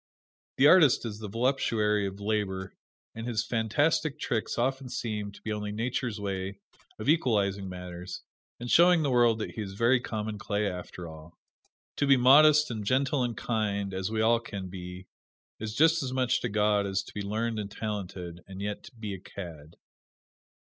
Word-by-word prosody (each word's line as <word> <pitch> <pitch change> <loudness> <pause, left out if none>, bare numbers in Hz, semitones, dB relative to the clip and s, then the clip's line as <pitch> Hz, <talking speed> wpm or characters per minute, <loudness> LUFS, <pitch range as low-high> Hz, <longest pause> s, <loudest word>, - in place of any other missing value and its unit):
The 135 - +5
artist 150 -6 +6
is 105 -2 -5
the 110 - -6
voluptuary 110 -3 +1
of 95 +1 -7
labor, 100 -2 -2 0.4
and 115 +1 -6
his 115 -1 -1
fantastic 140 +6 +1
tricks 115 -7 -2
often 130 +2 -1
seem 105 -4 -3
to 100 - -16
be 110 - -2
only 105 0 -4
Nature's 115 0 -2
way 95 -1 -4 0.4
of 110 - -6
equalizing 100 - +2
matters, 90 0 -7 0.4
and 120 0 -5
showing 175 -1 +6
the 140 - +1
world 120 -2 +4
that 110 - -4
he 110 - -6
is 95 -2 -6
very 120 +4 +3
common 110 -3 -4
clay, 105 +1 -1
after 90 -1 -6
all. 80 +1 -12 0.6
To 145 - +1
be 135 -1 +6
modest 150 +3 +6
and 110 -2 -4
gentle 135 +5 +1
and 120 -2 -3
kind, 100 -4 -1
as 95 +1 -2
we 110 0 -1
all 115 +1 +4
can 100 -5 -7
be, 90 0 -8 0.5
is 110 0 -5
just 160 +4 +4
as 130 -2 -3
much 130 -1 +1
to 125 - -2
God 105 -1 +2
as 95 0 -1
to - - -13
be 105 - -4
learned 110 +2 -2
and 100 -1 -4
talented, 95 -5 -5
and 95 0 -9
yet 105 +1 -5
be 105 -2 -4
a 95 - -6
cad. 85 -5 -10
110 Hz, 180 wpm, -28 LUFS, 100-125 Hz, 0.6 s, artist